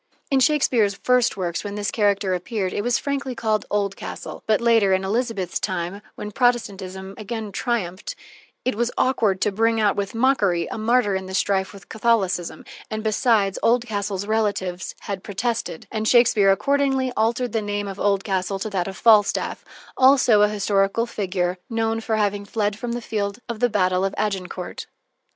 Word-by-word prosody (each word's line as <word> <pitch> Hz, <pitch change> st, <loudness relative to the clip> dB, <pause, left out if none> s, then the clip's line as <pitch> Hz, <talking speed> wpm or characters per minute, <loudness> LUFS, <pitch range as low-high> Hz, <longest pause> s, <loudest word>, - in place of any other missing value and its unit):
In 270 Hz, -, +4 dB
Shakespeare's 255 Hz, -8 st, +3 dB
first 250 Hz, -1 st, +2 dB
works, 175 Hz, -3 st, -2 dB
when 205 Hz, -1 st, -5 dB
this 205 Hz, 0 st, -2 dB
character 200 Hz, -3 st, +1 dB
appeared, 185 Hz, +1 st, -2 dB
it -, -, -1 dB
was 240 Hz, +1 st, +2 dB
frankly 275 Hz, -2 st, -3 dB
called 220 Hz, -2 st, -1 dB
"Oldcastle," 200 Hz, -1 st, -3 dB
but 215 Hz, -1 st, +3 dB
later, 225 Hz, -5 st, +4 dB
in 190 Hz, 0 st, +1 dB
Elizabeth's 205 Hz, -3 st, -1 dB
time, 185 Hz, +2 st, -3 dB
when 210 Hz, -, -6 dB
Protestantism 195 Hz, -6 st, -1 dB
again 215 Hz, 0 st, -5 dB
triumphed, 205 Hz, -, -3 dB, 0.5 s
it 255 Hz, -, +1 dB
was 235 Hz, +2 st, 0 dB
awkward 220 Hz, -7 st, +2 dB
to 210 Hz, -, +2 dB
bring 225 Hz, +2 st, +1 dB
out 210 Hz, -2 st, +3 dB
with 200 Hz, +1 st, -3 dB
mockery 205 Hz, -9 st, +2 dB
a -, -, -4 dB
martyr 225 Hz, -2 st, +2 dB
in 190 Hz, 0 st, -3 dB
the 190 Hz, -, -5 dB
strife 190 Hz, -1 st, +1 dB
with 200 Hz, -2 st, -14 dB
Catholicism, 205 Hz, -6 st, 0 dB, 0.2 s
and, 215 Hz, -1 st, -4 dB
besides, 215 Hz, -3 st, +2 dB
Oldcastle's 205 Hz, -5 st, 0 dB
relatives 200 Hz, -4 st, -1 dB
had 200 Hz, -2 st, -5 dB
protested, 220 Hz, -4 st, -3 dB
and 220 Hz, -1 st, -2 dB
Shakespeare 225 Hz, -5 st, +5 dB
accordingly 270 Hz, +3 st, +1 dB
altered 230 Hz, +2 st, 0 dB
the 225 Hz, -, 0 dB
name 205 Hz, 0 st, -3 dB
of 195 Hz, 0 st, -7 dB
Oldcastle 195 Hz, -1 st, 0 dB
to 210 Hz, +2 st, -4 dB
that 185 Hz, -2 st, -1 dB
of 190 Hz, -1 st, -6 dB
Falstaff, 215 Hz, -3 st, +3 dB, 0.3 s
also 260 Hz, -5 st, +5 dB
a 210 Hz, -, +5 dB
historical 200 Hz, +1 st, +1 dB
figure, 185 Hz, -5 st, -2 dB
known 225 Hz, -1 st, -1 dB
for 225 Hz, 0 st, -1 dB
having 205 Hz, -1 st, 0 dB
fled 205 Hz, 0 st, -1 dB
from 235 Hz, +2 st, -4 dB
the 240 Hz, -1 st, -4 dB
field 200 Hz, -2 st, -2 dB
of 235 Hz, -3 st, -5 dB
battle 185 Hz, -2 st, +2 dB
at 195 Hz, -, -2 dB
Agincourt. 190 Hz, -3 st, -3 dB
210 Hz, 165 wpm, -23 LUFS, 195-230 Hz, 0.5 s, Shakespeare